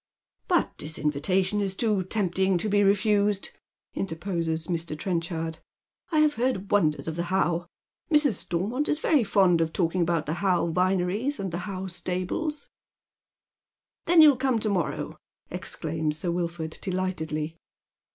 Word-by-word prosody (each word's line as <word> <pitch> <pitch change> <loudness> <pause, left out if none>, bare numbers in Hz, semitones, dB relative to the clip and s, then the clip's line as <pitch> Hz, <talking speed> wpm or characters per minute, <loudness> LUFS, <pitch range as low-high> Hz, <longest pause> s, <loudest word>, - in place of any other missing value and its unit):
" - - -67
But - - +1
this 155 +2 -3
invitation 185 +7 +1
is 195 -1 -1
too 210 -2 +1
tempting 190 -1 +1
to 175 - -2
be 205 0 +3
refused," 205 0 +2 0.4
interposes 165 -3 -2
Mr. 165 -3 -2
Trenchard. 165 -1 -3 0.3
" - - -42
I 310 -2 +4
have 305 -1 +4
heard 235 -6 -1
wonders 160 -8 +2
of 160 - -3
the 170 +1 -2
How. 175 -2 0 0.4
Mrs. 295 -5 +5
Stormont 205 - -1
is 300 - +2
very 300 -4 +3
fond 190 -4 +3
of 160 -1 0
talking 175 +1 0
about 170 -2 +1
the 150 - -2
How 185 -4 +2
vineries 185 - 0
and 195 -2 -3
tho 170 - -3
How 190 0 -5
stables." 185 - -3 1.4
"Then 335 -2 +7
you'll 290 -4 +7
come 260 -2 +1
to 215 - 0
morrow," 180 -6 -2 0.3
exclaims 155 -1 -2
Sir 170 +2 -2
Wilford, 170 -2 -3
delightedly. 165 -4 -2
185 Hz, 150 wpm, -26 LUFS, 165-205 Hz, 1.4 s, Then